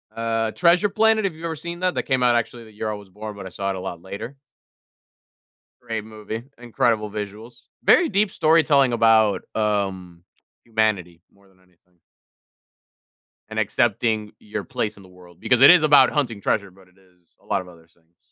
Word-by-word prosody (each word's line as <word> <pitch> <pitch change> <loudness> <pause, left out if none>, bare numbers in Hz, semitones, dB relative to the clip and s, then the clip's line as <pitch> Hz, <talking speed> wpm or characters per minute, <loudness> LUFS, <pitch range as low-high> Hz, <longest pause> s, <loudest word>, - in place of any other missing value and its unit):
Uh, 115 -1 -1
Treasure 175 - +3
Planet, 220 +1 +2
have 185 -5 -2
you 160 - -13
ever 165 -1 -3
seen 170 +3 -7
that? 185 -1 0
That - - -1
came 130 -1 0
out, 120 -1 +4
actually, 120 0 -2
the 110 - -16
year 110 +1 -4
I - - -2
was 100 -2 -12
born, 105 +2 -8
but 100 - -9
I - - -7
saw 100 +1 -4
it 95 - -2
a - - -6
lot 90 -2 -7
later. 110 +9 -8 1.4
Great 115 -3 -5
movie, 110 +1 -7
incredible 115 -2 -1
visuals, 105 +3 -8 0.2
very 355 - +5
deep 205 0 +1
storytelling 155 -5 +3
about, 110 -2 +3
um, 95 -5 -2 0.4
humanity 110 -7 -1
more 100 0 -26
than 95 -1 -28
anything 90 -1 -33 1.5
and 110 0 -4
accepting 110 0 0
your 105 - -6
place 125 -6 -3
in 100 - -15
the 95 - -17
world, 90 -2 -18
because 125 0 +2
it 135 - +10
is 180 -3 +8
about 145 -4 +6
hunting 120 -9 -2
treasure, 100 0 -1
but 95 0 -21
it 90 - -30
is 90 -3 -29
a - - -27
lot - - -1
of 90 - -13
other 85 -2 -18
things. 85 0 -35
110 Hz, 190 wpm, -22 LUFS, 95-125 Hz, 1.5 s, it